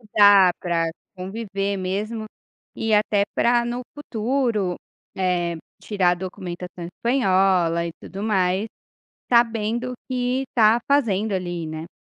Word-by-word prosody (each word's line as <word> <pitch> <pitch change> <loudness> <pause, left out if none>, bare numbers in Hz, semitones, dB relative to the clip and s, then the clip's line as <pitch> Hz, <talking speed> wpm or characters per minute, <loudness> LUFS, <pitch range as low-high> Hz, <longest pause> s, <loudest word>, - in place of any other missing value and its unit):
estudar, 205 -4 +6
para 170 -2 0 0.3
conviver 195 +1 -3
mesmo 210 +4 -3 0.5
e 225 -1 0
até 210 -1 +3
para 240 0 +3
no 240 +1 -3
futuro, 235 -7 -1 0.4
eh, 175 -2 0 0.3
tirar 195 -4 +2
a - - +1
documentação 180 -1 -7
espanhola 185 -6 +2
e 170 - -5
tudo 195 +1 -8
mais, 195 -1 +1 0.6
sabendo 235 +1 +2
o - - -5
que 250 0 0
está 225 -1 +4
fazendo 220 -7 +2
ali, 175 -3 -3
né. 155 +2 -7
200 Hz, 120 wpm, -23 LUFS, 180-230 Hz, 0.6 s, estudar